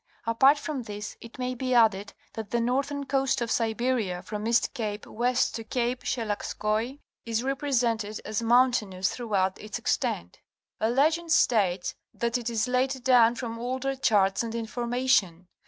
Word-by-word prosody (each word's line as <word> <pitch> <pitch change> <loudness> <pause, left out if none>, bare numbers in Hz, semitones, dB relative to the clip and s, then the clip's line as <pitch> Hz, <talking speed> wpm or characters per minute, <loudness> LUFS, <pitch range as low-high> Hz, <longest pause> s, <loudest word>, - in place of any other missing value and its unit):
Apart 265 +6 +5
from 290 -2 -4
this, 210 -2 -7
it 230 - -12
may 255 0 -2
be 255 0 -1
added 210 -4 +3 0.2
that 220 -2 -6
the 235 - 0
northern 275 +4 -1
coast 270 -1 +1
of 235 -1 -2
Siberia 225 -5 0
from 210 +2 -4
East 235 0 +2
Cape 210 -3 -4
west 245 +2 0
to 225 - -5
Cape 245 +2 -1
Sheiagskoi 220 +2 -2 0.3
is 230 0 -1
represented 240 -6 0
as 215 +1 -2
mountainous 230 -6 +2
throughout 195 -6 -1
its 215 -1 -5
extent. 85 +1 -2 0.4
A 220 - +1
legend 320 +7 +2
states 195 - +2 0.2
that 235 0 -1
it 240 0 -3
is 230 0 0
laid 255 +1 0
down 240 -2 +5
from 230 -2 -5
older 260 +3 -2
charts 200 -7 +2
and 230 -1 -4
information. 235 -6 0
235 Hz, 155 wpm, -27 LUFS, 215-255 Hz, 0.4 s, Apart